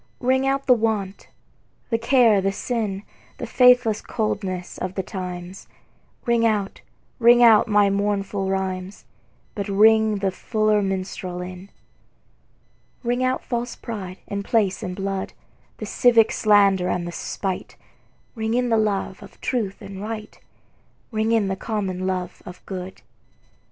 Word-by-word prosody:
Ring 260 +1 +2
out 275 0 0
the 255 - +6
want, 215 -4 -2 0.6
the 230 - +1
care 230 -4 +4
the 195 +1 +1
sin, 205 -2 -3 0.3
The - - -5
faithless 250 -4 +4
coldness 190 -5 -3
of 185 +1 -4
the 190 - -2
times; 180 0 -7 0.6
Ring 235 -2 +2
out, 210 -3 0 0.4
ring 240 +1 +6
out 225 -3 +7
my 205 -2 +4
mournful 200 -1 -1
rhymes, 190 0 -3 0.5
But 200 -2 -4
ring 220 +2 +5
the 195 -1 -1
fuller 215 +1 +1
minstrel 185 -2 -3
in. 180 +2 -8 1.3
Ring 245 +1 0
out 255 0 0
false 240 0 -3
pride 195 -5 -7
in 200 0 -4
place 200 -2 +1
and 180 -4 -4
blood, 195 0 -3 0.4
The - - -6
civic 235 -3 +4
slander 200 -4 +4
and 175 -1 -1
the - - -5
spite; 190 +2 -4 0.6
Ring 220 -1 -2
in 250 0 +1
the 225 - +3
love 200 -3 -1
of - - -14
truth 220 -7 -2
and 195 0 -8
right, 215 0 -6 0.7
Ring 220 0 0
in 225 -3 +2
the 190 - -1
common 190 -3 -3
love 185 -1 -3
of 180 0 -12
good. 185 -1 -7
205 Hz, 140 wpm, -23 LUFS, 190-225 Hz, 1.3 s, out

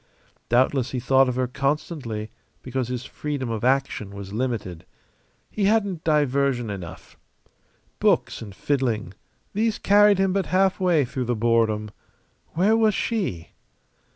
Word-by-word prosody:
Doubtless 130 +1 +2
he 130 - -3
thought 135 +1 +3
of 125 - -2
her 130 0 +1
constantly 135 -5 -3 0.3
because 130 -1 -2
his 125 0 -4
freedom 140 -6 -4
of 110 -1 -3
action 130 -5 0
was 100 0 -8
limited. 110 -8 -3 0.7
He 205 - -1
hadn't 200 -5 +1
diversion 140 -6 +1
enough. 90 -5 -9 0.8
Books - - +1
and 100 -4 -9
fiddling, 120 -9 -1 0.4
these 220 +1 0
carried 205 0 +5
him 190 -1 +1
but 195 -1 0
halfway 185 -5 +2
through 125 +1 -4
the 120 0 0
boredom. 110 -2 +1 0.6
Where 195 +6 +3
was 220 -2 +3
she? 185 - -2
130 Hz, 130 wpm, -24 LUFS, 115-180 Hz, 0.8 s, carried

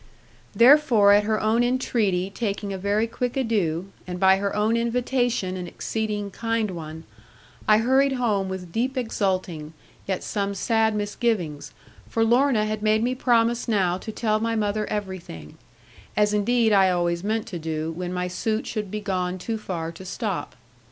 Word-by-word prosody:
Therefore 235 -5 +6
at 205 0 +5
her 215 0 +1
own 225 +2 +2
entreaty 215 -7 0
taking 200 -2 -3
a - - -3
very 205 +3 +1
quick 245 +2 -3
adieu, 195 -8 0 0.2
and 180 0 -5
by 190 0 +5
her 200 +1 -2
own 215 +2 +2
invitation 235 -4 0
an 180 -1 -5
exceeding 210 +2 -3
kind 225 -2 -1
one, 160 -2 -7 0.6
I 215 - +6
hurried 265 +4 +3
home 210 -7 0
with 185 -2 -6
deep 255 +7 -1
exulting, 185 -9 -2 0.3
yet 190 -2 -2
some 200 -1 -2
sad 220 +1 +1
misgivings, 205 -7 -2 0.4
for 225 - +1
Lorna 240 -1 +3
had 215 0 -3
made 215 +1 +2
me 250 +1 +1
promise 235 -2 +2
now 190 -5 +1
to 220 - -6
tell 215 -1 0
my 230 +1 -1
mother 210 0 -1
everything; 185 - -6 0.6
as 210 0 +3
indeed 225 +1 +2
I 190 -2 +5
always 175 -1 0
meant 220 +1 -1
to 175 -5 -5
do, 160 0 -3
when 175 +2 -5
my 180 0 -2
suit 215 +5 -2
should 210 -3 -4
be 210 +2 -4
gone 185 -2 -2
too 220 +4 -4
far 165 -5 -4
to 170 +3 -11
stop. 185 - -4
210 Hz, 165 wpm, -24 LUFS, 185-230 Hz, 0.6 s, Therefore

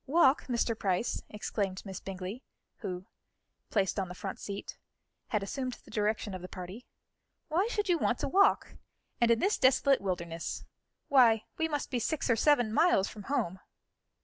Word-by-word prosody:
"Walk, 285 -1 +4
Mr. 235 -2 0
Price?" 195 +1 0
exclaimed 200 -2 -3
Miss 190 -2 -6
Bingley, 195 +5 -6 0.4
who, 180 0 -5 0.6
placed 200 -1 +1
on 190 - -1
the 180 - -7
front 195 +1 -5
seat, 200 0 -6 0.5
had 210 -3 0
assumed 255 +5 -3
the - - -14
direction 210 -1 0
of 185 - -5
the 180 - -7
party. 185 +7 -8 0.6
"Why 355 +7 +2
should 415 -4 -1
you 350 -3 +3
want 245 - +1
to - - 0
walk? 395 +7 +3 0.4
And 235 - +4
in 230 - +5
this 395 - +1
desolate 270 +1 +4
wilderness! 170 -3 -3 0.4
Why, 235 -5 +5 0.2
we 320 - +2
must 295 -3 -3
be 250 - 0
six 275 +1 0
or - - +5
seven 245 -3 +3
miles 275 - +4
from 205 -2 -10
home." 190 -10 0
225 Hz, 170 wpm, -31 LUFS, 190-275 Hz, 0.6 s, in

